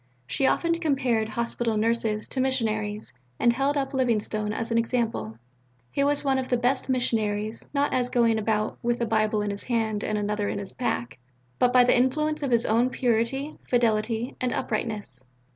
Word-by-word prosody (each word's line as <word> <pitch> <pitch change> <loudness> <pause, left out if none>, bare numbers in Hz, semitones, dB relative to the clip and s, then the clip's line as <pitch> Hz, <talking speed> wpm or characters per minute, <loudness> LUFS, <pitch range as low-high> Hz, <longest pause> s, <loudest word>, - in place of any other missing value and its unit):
She 265 - +1
often 335 +4 +2
compared 255 -8 +1
Hospital 235 -1 -1
Nurses 220 -1 0
to 260 - -1
missionaries, 215 -5 -1 0.3
and 235 - +4
held 275 +3 +1
up 270 0 -2
Livingstone 215 -4 0
as 225 +2 -3
an 230 - +3
example. 230 - -1 0.5
He 280 - +1
was 290 +1 +1
one 270 -1 +2
of 255 - -4
the 245 - +2
best 245 +3 +1
of - - -20
missionaries, 220 -4 -1
not 285 0 +1
as 250 -1 +1
going 230 -3 +3
about 215 0 -1
"with 240 0 0
a 235 - +1
Bible 215 -1 +1
in 205 - -1
his 200 - -5
hand 220 -3 0
and 215 - -1
another 210 0 -1
in - - -3
his 200 -1 -5
pack," 125 - -3 0.4
but 245 - +4
by 250 0 +6
the 245 - +4
influence 305 +5 +1
of 280 - -1
his 235 -1 +2
own 235 +3 +3
purity, 255 +4 -1
fidelity, 230 0 +1
and 250 -1 0
uprightness. 210 - -3
235 Hz, 185 wpm, -26 LUFS, 215-255 Hz, 0.5 s, by